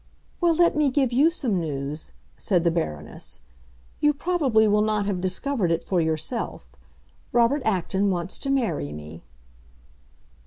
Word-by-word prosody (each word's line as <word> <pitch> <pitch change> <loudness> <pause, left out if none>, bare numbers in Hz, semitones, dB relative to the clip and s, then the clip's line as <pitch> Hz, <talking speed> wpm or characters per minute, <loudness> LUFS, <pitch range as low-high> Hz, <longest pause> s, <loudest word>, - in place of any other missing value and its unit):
"Well, 340 -2 +4
let 345 0 +4
me 300 -2 +3
give 260 -2 +1
you 285 +6 +5
some 250 - -1
news," 145 -1 -4 0.2
said 175 - +1
the 170 - +3
Baroness. 75 - -4 0.6
"You 295 -1 +3
probably 280 -10 +2
will 210 0 +3
not 210 -1 +1
have 195 -3 -2
discovered 190 +1 -1
it 165 - 0
for 180 -3 +1
yourself. 160 +9 -3 0.6
Robert 240 +4 +3
Acton 195 0 +1
wants 180 -1 -2
to 275 - -4
marry 230 - 0
me." 75 +2 -9
205 Hz, 145 wpm, -25 LUFS, 165-275 Hz, 0.6 s, you